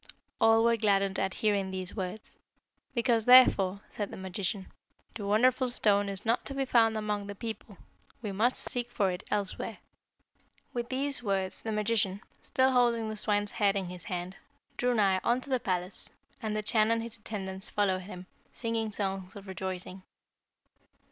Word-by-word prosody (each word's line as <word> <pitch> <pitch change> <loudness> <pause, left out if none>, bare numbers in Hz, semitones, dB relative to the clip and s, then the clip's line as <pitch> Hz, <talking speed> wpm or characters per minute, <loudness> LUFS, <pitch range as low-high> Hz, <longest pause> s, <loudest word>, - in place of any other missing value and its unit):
All 225 0 +6
were 235 0 +4
gladdened 195 -2 +2
at 190 0 -1
hearing 200 -2 +2
these 185 0 -4
words. 190 +1 -5 0.6
'Because, 235 -2 +2
therefore,' 200 -6 +6
said 205 -2 -4
the - - -8
magician, 190 +1 -4 0.5
'the 215 - -6
wonderful 250 +5 +3
stone 205 -4 +2
is 195 +1 -4
not 230 +2 +1
to 275 - -5
be 270 0 0
found 225 -3 +3
among 210 -1 -2
the 200 - -6
people, 220 -2 -7 0.4
we 215 -4 -4
must 225 +6 +2
seek 245 -1 +1
for 200 -5 +1
it 180 - -5
elsewhere.' 205 -2 -2 1.0
"With 240 -1 -3
these 275 +1 -2
words 195 -4 -1
the 225 - -3
magician, 210 -2 0 0.2
still 260 -1 +2
holding 235 -3 +2
the 215 - -4
swine's 205 -1 0
head 205 -2 +2
in 190 -3 -2
his 180 -1 -8
hand, 180 +1 -4 0.4
drew 245 0 +1
nigh 195 -3 +3
unto 255 +3 0
the 255 - +2
palace, 185 -2 -3 0.3
and 215 -2 -2
the 215 - -2
Chan 215 0 +3
and 230 0 +1
his 230 -1 -9
attendants 190 -3 -5
followed 190 -3 +1
him, 185 -1 -9 0.3
singing 225 -2 -2
songs 195 -2 -3
of 200 -1 -10
rejoicing. 190 0 -5
210 Hz, 170 wpm, -30 LUFS, 190-230 Hz, 1.0 s, All